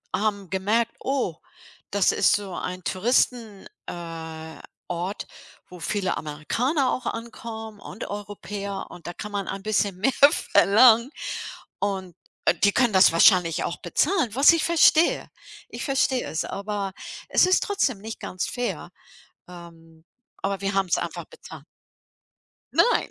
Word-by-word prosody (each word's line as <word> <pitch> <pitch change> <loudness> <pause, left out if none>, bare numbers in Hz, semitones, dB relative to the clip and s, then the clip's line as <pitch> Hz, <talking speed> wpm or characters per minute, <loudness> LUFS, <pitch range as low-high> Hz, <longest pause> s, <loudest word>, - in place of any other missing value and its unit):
haben 200 -3 -2
gemerkt: 215 +5 0
„Oh, 255 - -2 0.5
das 200 -2 +3
ist 195 - +4
so 200 -3 -2
ein 180 0 -5
Touristen 225 0 0 0.2
äh, 160 -2 -7 0.3
Ort, 180 +3 -4 0.4
wo 180 -1 -12
viele 195 +2 -1
Amerikaner 245 - -1
auch 250 - -4
ankommen 225 -2 -6
und 195 - -8
Europäer 200 -1 -6
und 175 - -13
da 175 - -5
kann 210 +2 -7
man 200 -1 -2
ein 195 - -4
bisschen 205 -3 0
mehr 225 +8 +2 0.4
verlangen 235 +5 +6 0.7
und, 190 -4 -3 0.3
äh, - - +4
die 200 - +6
können 240 -2 +3
das 190 -3 +6
wahrscheinlich 170 -1 +4
auch - - -4
bezahlen“, 280 - +1
was 275 +5 +7
ich 330 - +1
verstehe. 335 0 +4 0.4
Ich - - -6
verstehe 265 -2 +1
es, 160 - -2
aber 200 0 -4 0.4
es - - +5
ist 370 - +3
trotzdem 280 - 0
nicht 220 +2 -8
ganz 180 - -4
fair. 245 -1 -4 0.6
Ähm, 165 -2 -14 0.4
aber 195 0 -2
wir 195 - -1
haben's 195 -3 +1
einfach - - -5
bezahlt. 485 - -13 1.1
Nein. 485 - +3
200 Hz, 140 wpm, -24 LUFS, 180-235 Hz, 1.1 s, was